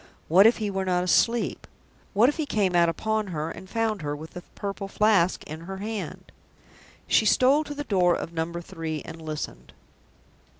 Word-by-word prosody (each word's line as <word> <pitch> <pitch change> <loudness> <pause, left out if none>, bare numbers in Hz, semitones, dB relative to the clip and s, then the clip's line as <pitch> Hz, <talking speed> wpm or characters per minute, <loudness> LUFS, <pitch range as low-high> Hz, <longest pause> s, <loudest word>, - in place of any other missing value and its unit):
What 190 +6 +7
if 230 - +3
he 210 -2 -2
were 195 0 -1
not 180 -1 +1
asleep? 230 +6 +1 0.5
What 220 +4 +5
if 295 - 0
he 310 -3 -2
came 200 -7 +1
out 170 -1 +5
upon 220 +5 -1
her, 160 -2 -3
and 190 - -10
found 220 -3 -1
her 145 -1 -3
with 155 +2 -9
the 180 - -8
Purple 200 0 -4
Flask 195 -3 +2
in 155 +1 -8
her 190 +3 -7
hand? 210 +1 -6 0.7
She 220 - +3
stole 270 +7 +4
to 295 - -6
the 290 - -4
door 180 -8 +3
of 170 - -5
Number 170 +1 -3
Three 165 -4 -5
and 165 0 -9
listened. 150 - -6
190 Hz, 185 wpm, -26 LUFS, 165-220 Hz, 0.7 s, What